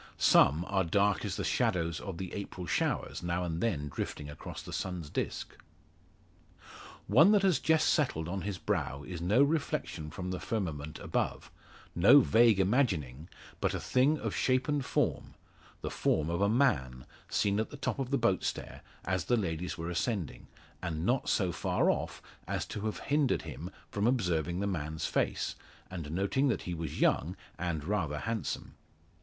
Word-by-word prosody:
Some 75 Hz, +6 st, +5 dB
are 95 Hz, -1 st, +1 dB
dark 100 Hz, +3 st, +2 dB
as -, -, -2 dB
the -, -, -3 dB
shadows 85 Hz, -2 st, 0 dB
of 95 Hz, -4 st, -6 dB
the 95 Hz, 0 st, -5 dB
April 95 Hz, -2 st, -5 dB
showers -, -, -1 dB
now 85 Hz, +1 st, -1 dB
and 85 Hz, -1 st, -3 dB
then 80 Hz, -11 st, 0 dB
drifting 75 Hz, +1 st, -5 dB
across 75 Hz, -, -8 dB
the -, -, -8 dB
sun's 90 Hz, -5 st, -4 dB
disc. -, -, -3 dB, 1.5 s
One 155 Hz, -, +6 dB
that 205 Hz, -2 st, +4 dB
has 185 Hz, -5 st, +4 dB
just 160 Hz, -1 st, +3 dB
settled 80 Hz, -, +1 dB
on 95 Hz, +2 st, -3 dB
his 100 Hz, +1 st, -3 dB
brow 70 Hz, -5 st, -2 dB
is 85 Hz, 0 st, -6 dB
no 105 Hz, +10 st, +4 dB
reflection 145 Hz, -, -1 dB
from 90 Hz, +2 st, -5 dB
the 90 Hz, -, -3 dB
firmament 80 Hz, -8 st, -3 dB
above -, -, -2 dB, 0.4 s
no 100 Hz, +12 st, +8 dB
vague 115 Hz, -3 st, +5 dB
imagining 90 Hz, -, +1 dB, 0.3 s
but -, -, 0 dB
a -, -, -2 dB
thing 135 Hz, +5 st, +2 dB
of -, -, -3 dB
shape 130 Hz, 0 st, +2 dB
and 145 Hz, -2 st, 0 dB
form -, -, -1 dB, 0.5 s
the -, -, -4 dB
form 80 Hz, +2 st, +1 dB
of 85 Hz, +2 st, -1 dB
a 100 Hz, -, +4 dB
man, 70 Hz, -, +1 dB, 0.2 s
seen 100 Hz, 0 st, +1 dB
at 110 Hz, -, -1 dB
the 145 Hz, -, -9 dB
top 140 Hz, -, -2 dB
of 130 Hz, -2 st, -2 dB
the 140 Hz, -, +2 dB
boat 115 Hz, -7 st, +2 dB
stair, -, -, -4 dB, 0.2 s
as 90 Hz, -1 st, -1 dB
the 120 Hz, -, +2 dB
ladies 90 Hz, -4 st, -2 dB
were 85 Hz, +1 st, -4 dB
ascending, 95 Hz, -, -2 dB, 0.3 s
and 85 Hz, -3 st, -3 dB
not 125 Hz, +3 st, +1 dB
so 95 Hz, -4 st, +2 dB
far 80 Hz, -, +1 dB
off -, -, -4 dB, 0.2 s
as -, -, -2 dB
to 105 Hz, +1 st, -4 dB
have 110 Hz, -, -4 dB
hindered 140 Hz, -, +1 dB
him 80 Hz, +2 st, -7 dB, 0.2 s
from 105 Hz, +2 st, +1 dB
observing 90 Hz, -, 0 dB
the -, -, 0 dB
man's 80 Hz, -5 st, -2 dB
face, -, -, 0 dB, 0.4 s
and 85 Hz, -5 st, -5 dB
noting 100 Hz, -, +1 dB
that 130 Hz, -, 0 dB
he 90 Hz, -, -4 dB
was 80 Hz, -3 st, -5 dB
young, 90 Hz, +6 st, +2 dB, 0.2 s
and 85 Hz, -4 st, -2 dB
rather 85 Hz, -6 st, -1 dB
handsome. 110 Hz, 0 st, -3 dB
95 Hz, 175 wpm, -31 LUFS, 80-115 Hz, 1.5 s, no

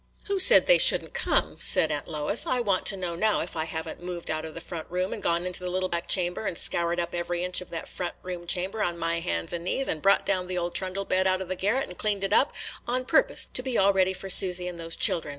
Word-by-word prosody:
"Who 400 Hz, -1 st, -2 dB
said 430 Hz, +7 st, +6 dB
they -, -, +5 dB
should -, -, +6 dB
n't -, -, -13 dB
come?" -, -, 0 dB
said 160 Hz, -, +2 dB
Aunt 145 Hz, -1 st, -4 dB
Lois. 155 Hz, +7 st, 0 dB
"I 255 Hz, -, +2 dB
want 200 Hz, -6 st, 0 dB
to 195 Hz, -, +3 dB
know 180 Hz, -2 st, -4 dB
now 215 Hz, +5 st, +1 dB
if -, -, -7 dB
I 160 Hz, -1 st, -2 dB
have 160 Hz, 0 st, -5 dB
n't -, -, -9 dB
moved 175 Hz, -2 st, -5 dB
out 155 Hz, 0 st, -3 dB
of 160 Hz, -, -10 dB
the -, -, -6 dB
front 165 Hz, -3 st, -8 dB
room 180 Hz, +2 st, -2 dB
and -, -, -6 dB
gone 170 Hz, +1 st, 0 dB
into 180 Hz, 0 st, -2 dB
the 180 Hz, 0 st, -5 dB
little 185 Hz, +1 st, -2 dB
back 170 Hz, -1 st, -3 dB
chamber, 180 Hz, +3 st, +1 dB
and 170 Hz, -, -3 dB
scoured 170 Hz, 0 st, +1 dB
up 170 Hz, 0 st, -3 dB
every 175 Hz, 0 st, -3 dB
inch 180 Hz, 0 st, +2 dB
of 180 Hz, -, -10 dB
that 165 Hz, -, -7 dB
front 175 Hz, -1 st, -6 dB
room 180 Hz, -1 st, -7 dB
chamber 190 Hz, +5 st, 0 dB
on 175 Hz, -1 st, -1 dB
my 165 Hz, 0 st, -1 dB
hands 85 Hz, -, -3 dB
and 170 Hz, -1 st, -4 dB
knees, 265 Hz, +9 st, -1 dB
and 155 Hz, -, -2 dB
brought 195 Hz, 0 st, +3 dB
down 185 Hz, -2 st, 0 dB
the 180 Hz, 0 st, -4 dB
old 175 Hz, 0 st, -3 dB
trundle 190 Hz, +1 st, -2 dB
bed 185 Hz, 0 st, +1 dB
out 185 Hz, 0 st, +1 dB
of 190 Hz, -1 st, -7 dB
the 185 Hz, -, -2 dB
garret 215 Hz, +9 st, -1 dB
and 180 Hz, -, -10 dB
cleaned 205 Hz, -2 st, 0 dB
it 195 Hz, +1 st, 0 dB
up, 275 Hz, -, +4 dB, 0.4 s
on 255 Hz, +1 st, -1 dB
purpose -, -, +2 dB
to -, -, -1 dB
be 255 Hz, -2 st, -3 dB
all 200 Hz, +1 st, +4 dB
ready 190 Hz, -1 st, +2 dB
for 195 Hz, -, -8 dB
Susy 180 Hz, -1 st, +5 dB
and 175 Hz, -1 st, -7 dB
those 165 Hz, 0 st, -5 dB
children. 165 Hz, -3 st, +4 dB
180 Hz, 280 wpm, -26 LUFS, 170-195 Hz, 0.4 s, said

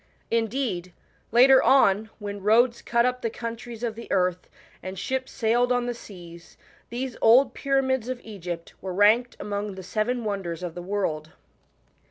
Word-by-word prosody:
Indeed, 225 Hz, -6 st, -1 dB, 0.4 s
later 260 Hz, +3 st, +7 dB
on, 220 Hz, -5 st, +4 dB
when 205 Hz, -1 st, -6 dB
roads 235 Hz, +4 st, +3 dB
cut 235 Hz, 0 st, +2 dB
up 250 Hz, 0 st, -1 dB
the 230 Hz, -, -1 dB
countries 230 Hz, 0 st, -7 dB
of 230 Hz, -2 st, -1 dB
the 230 Hz, +1 st, -10 dB
earth, 180 Hz, -1 st, 0 dB, 0.3 s
and 185 Hz, +1 st, -7 dB
ships 260 Hz, +7 st, -3 dB
sailed 240 Hz, +1 st, +1 dB
on 245 Hz, -1 st, +1 dB
the 245 Hz, -, -2 dB
seas, 175 Hz, -7 st, -13 dB, 0.3 s
these 250 Hz, +1 st, -4 dB
old 250 Hz, +5 st, +6 dB
pyramids 265 Hz, -3 st, 0 dB
of 255 Hz, -1 st, -3 dB
Egypt 175 Hz, -6 st, -7 dB
were 185 Hz, -1 st, -5 dB
ranked 220 Hz, +5 st, +3 dB
among 205 Hz, -1 st, -4 dB
the 190 Hz, -, -8 dB
Seven 230 Hz, +6 st, -1 dB
Wonders 190 Hz, -5 st, -4 dB
of 175 Hz, -2 st, -4 dB
the 175 Hz, -, -7 dB
World. 175 Hz, -5 st, -3 dB
220 Hz, 160 wpm, -25 LUFS, 190-245 Hz, 0.4 s, later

